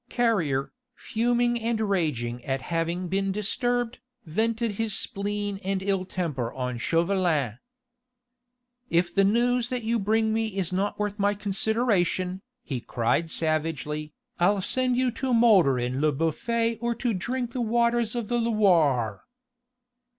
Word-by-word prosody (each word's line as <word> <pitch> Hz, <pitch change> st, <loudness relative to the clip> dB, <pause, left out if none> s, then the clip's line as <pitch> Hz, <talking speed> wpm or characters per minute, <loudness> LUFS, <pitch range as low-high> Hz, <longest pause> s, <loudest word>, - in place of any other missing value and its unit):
Carrier, 170 Hz, -, 0 dB, 0.2 s
fuming 240 Hz, +1 st, 0 dB
and 230 Hz, 0 st, 0 dB
raging 150 Hz, -, -1 dB
at 135 Hz, -1 st, -2 dB
having 170 Hz, +3 st, -2 dB
been 195 Hz, +2 st, 0 dB
disturbed, 245 Hz, +4 st, -1 dB, 0.3 s
vented 225 Hz, +7 st, 0 dB
his 215 Hz, 0 st, 0 dB
spleen 205 Hz, 0 st, -3 dB
and 190 Hz, 0 st, -1 dB
ill 195 Hz, -1 st, 0 dB
temper 150 Hz, -11 st, -3 dB
on 125 Hz, -2 st, -3 dB
Chauvelin. 165 Hz, -, +1 dB, 1.3 s
"If 175 Hz, +1 st, +1 dB
the 195 Hz, -, +4 dB
news 240 Hz, +4 st, +2 dB
that 250 Hz, -2 st, -3 dB
you 230 Hz, +1 st, +1 dB
bring 220 Hz, +2 st, +1 dB
me 220 Hz, -3 st, -1 dB
is 185 Hz, -1 st, -1 dB
not 195 Hz, +3 st, -1 dB
worth 210 Hz, 0 st, -3 dB
my 205 Hz, +1 st, +2 dB
consideration," 195 Hz, -3 st, 0 dB, 0.2 s
he 130 Hz, -, -3 dB
cried 125 Hz, +9 st, 0 dB
savagely, 155 Hz, -1 st, -2 dB, 0.2 s
"I'll 190 Hz, +2 st, +3 dB
send 255 Hz, +3 st, +1 dB
you 255 Hz, -1 st, +2 dB
to 250 Hz, +1 st, -1 dB
moulder 200 Hz, -, +5 dB
in 125 Hz, +2 st, -2 dB
Le 155 Hz, 0 st, +3 dB
Bouffay 230 Hz, -, 0 dB
or 235 Hz, 0 st, -1 dB
to 235 Hz, 0 st, -1 dB
drink 240 Hz, +5 st, -2 dB
the 255 Hz, -, -2 dB
waters 235 Hz, 0 st, +1 dB
of 235 Hz, -3 st, -2 dB
the 240 Hz, +1 st, 0 dB
Loire." 165 Hz, -, +2 dB
200 Hz, 140 wpm, -26 LUFS, 165-230 Hz, 1.3 s, moulder